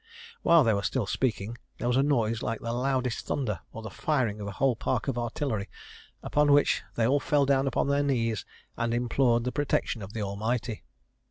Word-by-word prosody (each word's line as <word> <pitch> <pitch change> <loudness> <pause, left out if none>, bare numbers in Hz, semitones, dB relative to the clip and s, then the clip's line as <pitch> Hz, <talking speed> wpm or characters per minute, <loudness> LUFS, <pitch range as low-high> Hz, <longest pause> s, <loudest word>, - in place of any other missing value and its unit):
While 170 -3 +6
they 115 -3 +3
were 100 - 0
still 120 +2 -1
speaking, 115 0 -2 0.2
there 120 - -2
was 125 - +2
a 135 - +4
noise 115 -6 +1
like 115 -1 -2
the 115 0 -3
loudest 125 -1 -1
thunder, 105 - -1
or 115 - -8
the 110 - -6
firing 120 -6 0
of 100 - -5
a 100 - -5
whole 130 +2 +2
park - - -1
of - - 0
artillery; 120 -3 -2 0.5
upon 150 0 +2
which 145 - +4
they 115 - +2
all 140 +5 +3
fell 145 0 +2
down 135 0 +2
upon 135 - 0
their 140 0 +2
knees 115 -6 0 0.3
and 115 0 -1
implored 120 0 +2
the 125 - -1
protection 140 -5 -1
of 100 +1 -8
the 110 - -3
Almighty. 110 +3 -2
120 Hz, 200 wpm, -28 LUFS, 110-135 Hz, 0.5 s, While